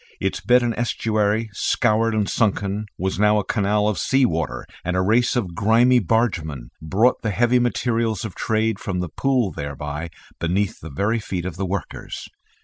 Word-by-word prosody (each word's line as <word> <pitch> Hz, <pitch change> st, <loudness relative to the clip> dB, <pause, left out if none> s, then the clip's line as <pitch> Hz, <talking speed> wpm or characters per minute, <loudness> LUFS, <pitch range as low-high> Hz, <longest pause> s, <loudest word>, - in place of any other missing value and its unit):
Its 95 Hz, -, -1 dB
bed 125 Hz, 0 st, +4 dB
and 120 Hz, -1 st, 0 dB
estuary, 110 Hz, -1 st, 0 dB
scoured 115 Hz, +1 st, +1 dB
and 105 Hz, -2 st, +1 dB
sunken, 105 Hz, -1 st, 0 dB
was 95 Hz, 0 st, -2 dB
now 105 Hz, 0 st, +4 dB
a 105 Hz, -, +1 dB
canal 105 Hz, +1 st, +1 dB
of 105 Hz, -, 0 dB
sea 135 Hz, -1 st, +3 dB
water, 80 Hz, -7 st, -2 dB, 0.2 s
and 90 Hz, +1 st, -1 dB
a -, -, +3 dB
race 120 Hz, +6 st, +2 dB
of 100 Hz, -8 st, -1 dB
grimy 115 Hz, +6 st, +4 dB
bargemen 85 Hz, -, -1 dB
brought 100 Hz, +11 st, +2 dB
the 110 Hz, -, -1 dB
heavy 120 Hz, +4 st, +3 dB
materials 115 Hz, -3 st, 0 dB
of 105 Hz, -, -6 dB
trade 110 Hz, -1 st, 0 dB
from 95 Hz, -2 st, -3 dB
the 90 Hz, -2 st, -3 dB
Pool 125 Hz, -, +1 dB
thereby 75 Hz, +3 st, -5 dB, 0.3 s
beneath 95 Hz, +4 st, -1 dB
the 80 Hz, -, -9 dB
very 100 Hz, +11 st, 0 dB
feet 95 Hz, -4 st, -4 dB
of 95 Hz, -, -4 dB
the 95 Hz, +1 st, -3 dB
workers. 95 Hz, 0 st, -5 dB
105 Hz, 175 wpm, -22 LUFS, 95-115 Hz, 0.3 s, bed